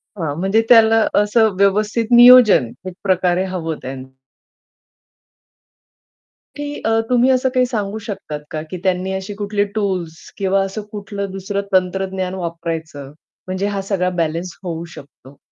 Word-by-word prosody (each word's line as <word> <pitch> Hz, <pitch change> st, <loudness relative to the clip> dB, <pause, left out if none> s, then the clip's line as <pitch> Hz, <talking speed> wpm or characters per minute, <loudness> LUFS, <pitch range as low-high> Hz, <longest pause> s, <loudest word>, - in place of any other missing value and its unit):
हां, 160 Hz, -6 st, -3 dB
म्हणजे 195 Hz, +4 st, +2 dB
त्याला 225 Hz, -1 st, +6 dB, 0.2 s
असं 220 Hz, +1 st, +3 dB
व्यवस्थित 210 Hz, +3 st, +1 dB
नियोजन 240 Hz, -, +7 dB, 0.2 s
एक 185 Hz, -, -6 dB
प्रकारे 185 Hz, -1 st, +2 dB
हवं 170 Hz, -4 st, -4 dB
त्यांन 130 Hz, 0 st, -7 dB, 2.5 s
की 290 Hz, 0 st, -5 dB
अ, 225 Hz, 0 st, +2 dB
तुम्ही 250 Hz, +1 st, +3 dB
असं 255 Hz, 0 st, +2 dB
काही 255 Hz, 0 st, +3 dB
सांगू 215 Hz, -4 st, -3 dB
शकतात 155 Hz, -7 st, -6 dB
का? 155 Hz, -, -3 dB
की 185 Hz, -, -4 dB
त्यांनी 185 Hz, 0 st, 0 dB
अशी 190 Hz, +1 st, -5 dB
कुठली 205 Hz, 0 st, -1 dB
टूल्स 185 Hz, -6 st, -2 dB, 0.2 s
किंवा 195 Hz, 0 st, +1 dB
असं 195 Hz, +2 st, -5 dB
कुठलं 200 Hz, -1 st, -5 dB
दुसरं 195 Hz, +1 st, -3 dB
तंत्रज्ञान 185 Hz, 0 st, 0 dB
वापरायचं, 165 Hz, -5 st, -5 dB, 0.4 s
म्हणजे 185 Hz, +2 st, -2 dB
हा 200 Hz, -1 st, -2 dB
सगळा 190 Hz, -2 st, -1 dB
बॅलन्स 170 Hz, +2 st, -3 dB
होऊ 170 Hz, -2 st, -5 dB
शकतो? 140 Hz, 0 st, -15 dB
190 Hz, 135 wpm, -19 LUFS, 175-215 Hz, 2.5 s, नियोजन